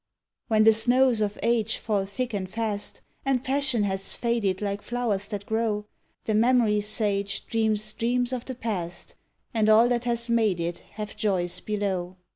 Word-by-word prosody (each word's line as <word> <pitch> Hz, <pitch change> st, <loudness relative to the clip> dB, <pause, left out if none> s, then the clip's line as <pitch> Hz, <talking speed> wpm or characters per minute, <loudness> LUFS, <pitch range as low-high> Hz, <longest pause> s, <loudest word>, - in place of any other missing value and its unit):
When 215 Hz, -2 st, +4 dB
the 220 Hz, 0 st, +7 dB
snows 245 Hz, +1 st, +3 dB
of 210 Hz, -1 st, -1 dB
age 230 Hz, -2 st, +1 dB
fall 205 Hz, -3 st, -1 dB
thick 240 Hz, +4 st, -3 dB
and 190 Hz, -2 st, -3 dB
fast, 215 Hz, -1 st, -3 dB, 0.2 s
and 265 Hz, -2 st, +1 dB
passion 265 Hz, -4 st, +2 dB
has 195 Hz, -1 st, -2 dB
faded 225 Hz, -6 st, 0 dB
like 200 Hz, -1 st, -3 dB
flowers 225 Hz, -5 st, -2 dB
that 205 Hz, -2 st, -5 dB
grow, 220 Hz, -1 st, -1 dB, 0.4 s
The 215 Hz, -, -1 dB
memory 225 Hz, -2 st, +3 dB
sage 205 Hz, -1 st, 0 dB
dreams 215 Hz, -1 st, 0 dB
dreams 245 Hz, +3 st, 0 dB
of 245 Hz, -2 st, -3 dB
the 260 Hz, -, -5 dB
past 180 Hz, -8 st, -4 dB, 0.4 s
and 220 Hz, -2 st, +2 dB
all 220 Hz, +2 st, +7 dB
that 245 Hz, -1 st, 0 dB
has 235 Hz, -1 st, 0 dB
made 220 Hz, -6 st, +2 dB
it 170 Hz, +1 st, -3 dB
have 210 Hz, -1 st, -6 dB
joys 180 Hz, -4 st, 0 dB
below. 190 Hz, -4 st, -3 dB
215 Hz, 165 wpm, -26 LUFS, 200-235 Hz, 0.4 s, the